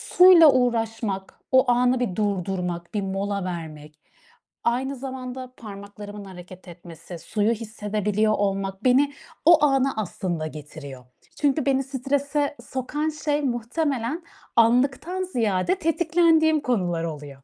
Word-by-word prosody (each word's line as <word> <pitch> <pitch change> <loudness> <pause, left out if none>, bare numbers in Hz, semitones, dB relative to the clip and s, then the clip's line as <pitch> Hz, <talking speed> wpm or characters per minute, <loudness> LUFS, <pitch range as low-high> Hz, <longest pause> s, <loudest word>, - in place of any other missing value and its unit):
suyla 355 -5 +9
uğraşmak, 225 -5 -1
o 260 -1 +5
anı 250 +1 +3
bir 195 -8 -2
durdurmak, 185 -3 -2
bir 205 - -1
mola 195 0 -2
vermek, 155 -4 -7 0.6
aynı 260 +4 0
zamanda 255 -1 -7
parmaklarımın 205 -1 -9
hareket 185 0 -12
etmesi, 170 0 -11
suyu 210 +5 0
hissedebiliyor 215 -1 -1
olmak 195 -1 -2
beni 275 +3 +4 0.3
o 325 -3 +7
ana 270 -1 +2
aslında 180 -5 -3
getiriyor. 145 -4 -10 0.4
Çünkü 285 0 +2
beni 270 -1 +2
strese 280 +2 -1
sokan 295 +4 -3
şey, 300 -1 -1
muhtemelen 265 +3 -2 0.3
anlıktan 270 +10 +2
ziyade 230 - 0
tetiklendiğim 325 -1 +3
konular 180 -10 -1
oluyor. 145 -4 -7
230 Hz, 115 wpm, -24 LUFS, 190-275 Hz, 0.6 s, suyla